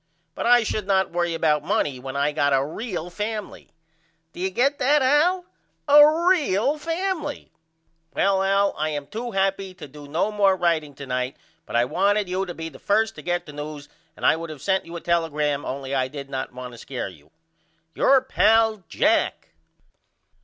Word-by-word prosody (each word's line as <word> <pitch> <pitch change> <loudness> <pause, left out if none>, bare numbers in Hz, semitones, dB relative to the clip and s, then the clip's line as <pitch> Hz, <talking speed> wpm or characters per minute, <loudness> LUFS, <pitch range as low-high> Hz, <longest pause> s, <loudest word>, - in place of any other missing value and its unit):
But - - -3
I 240 -1 +6
should 215 -2 -3
not 190 -1 +2
worry 175 -1 -1
about 150 -2 +1
money 155 -8 0
when 130 +1 -7
I 140 +1 +1
got 145 -1 +1
a 135 0 +1
real 175 +1 -5
family. 210 +2 -5 0.6
Do - - -11
you 190 +1 0
get 270 +9 +1
that 280 +2 +3
Al, 335 +7 +3 0.4
a 300 +4 +6
real 290 - +2
family? 330 -1 -3 0.6
Well 195 -1 +2
Al 195 +1 +2
I 155 +1 0
am 145 -2 -4
to 235 +3 -5
happy 195 -2 -1
to 150 - -10
do 145 +1 -12
no 165 +8 0
more 200 -2 +3
writeing 160 -5 0
to 140 - -8
night 125 0 -3 0.3
but - - -6
I 120 +1 +4
wanted 200 +7 +1
you 185 +1 -2
to 175 - -5
be 165 0 -5
the - - -12
1st 220 +2 +1
to - - -10
get 175 0 -2
the 150 - -11
news 145 0 -7 0.3
and - - -4
I - - +5
would 165 0 -6
of 150 -4 -9
sent 190 -3 0
you 170 - -8
a 170 - -6
telegram 150 -4 0
only 135 +1 -5
I 130 -1 +1
did 140 0 -9
not 130 0 -4
want 125 0 -8
to 120 - -12
scare 130 -1 -5
you. 80 -5 -15 0.6
Your 270 -1 +4
pal, 225 -4 +3
JACK. - - +1
180 Hz, 190 wpm, -24 LUFS, 145-220 Hz, 0.6 s, I